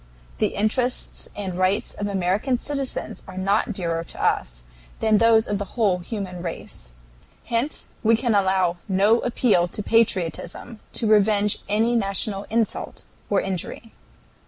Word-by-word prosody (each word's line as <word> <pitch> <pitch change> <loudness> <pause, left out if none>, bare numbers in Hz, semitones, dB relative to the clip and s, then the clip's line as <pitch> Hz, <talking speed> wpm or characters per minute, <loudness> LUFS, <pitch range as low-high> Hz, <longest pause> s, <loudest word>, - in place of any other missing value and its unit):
The - - +1
interests 245 +5 -1
and 185 -3 -4
rights 185 +3 +1
of 205 - -3
American 200 +6 0
citizens 275 0 -3
are 185 - -9
not 200 +4 +1
dearer 170 -4 -2
to - - -7
us - - 0 0.3
than 220 -2 +3
those 225 -1 +5
of 205 -1 -2
the 200 +4 -7
whole 200 -6 +3
human 180 -1 -5
race. 165 - -6 0.6
Hence 240 +5 -2
we 225 +1 +4
can 230 0 +1
allow 190 -3 +2
no 205 +4 +4
appeal 230 -8 +2
to 205 +4 -5
patriotism 225 +1 0
to 230 - -1
revenge 210 -1 +4
any 225 +3 +2
national 200 -1 -1
insult 225 0 -1 0.3
or 200 - +3
injury... 195 +4 -4
205 Hz, 140 wpm, -23 LUFS, 185-225 Hz, 0.6 s, those